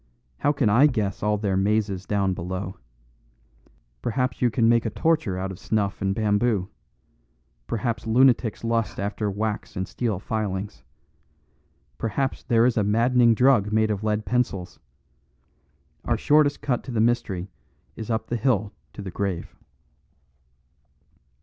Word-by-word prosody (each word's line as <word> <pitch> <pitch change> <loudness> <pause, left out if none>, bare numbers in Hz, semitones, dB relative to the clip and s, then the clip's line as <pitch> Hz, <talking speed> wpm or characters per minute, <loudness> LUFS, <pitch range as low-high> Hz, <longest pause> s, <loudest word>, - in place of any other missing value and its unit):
How 145 - +2
can 135 -5 +1
I 120 +8 +6
guess 105 -8 -2
all 105 0 +1
their 100 -2 -1
mazes 100 -1 0
down 100 -2 +1
below? 95 +1 -5 1.2
Perhaps 125 +1 -1
you 125 - +4
can 115 +1 +2
make 115 0 +4
a 110 - -1
torture 155 - 0
out 95 +1 -3
of 95 - -9
snuff 100 -3 -1
and 95 0 0
bamboo. 105 -2 +1 1.0
Perhaps 115 0 -2
lunatics 120 -2 +3
lust 115 -1 -1
after 105 +1 -2
wax 105 +2 -3
and 95 -1 -3
steel 115 -4 -2
filings. 100 - -4 1.2
Perhaps 130 +5 -1
there 115 0 +3
is 125 -2 +2
a 105 - +3
maddening 115 +3 +3
drug 125 -5 +4
made 110 0 +2
of 105 0 -3
lead 105 0 0
pencils! 100 -5 -1 1.2
Our - - 0
shortest 145 -1 +3
cut 125 -4 0
to 130 - -6
the 115 - -1
mystery 100 -5 0 0.4
is 110 - -7
up 110 -1 -1
the 120 - -2
hill 110 -4 0 0.2
to 100 - -8
the 95 - -6
grave." 95 -2 -3
110 Hz, 145 wpm, -24 LUFS, 100-120 Hz, 1.2 s, I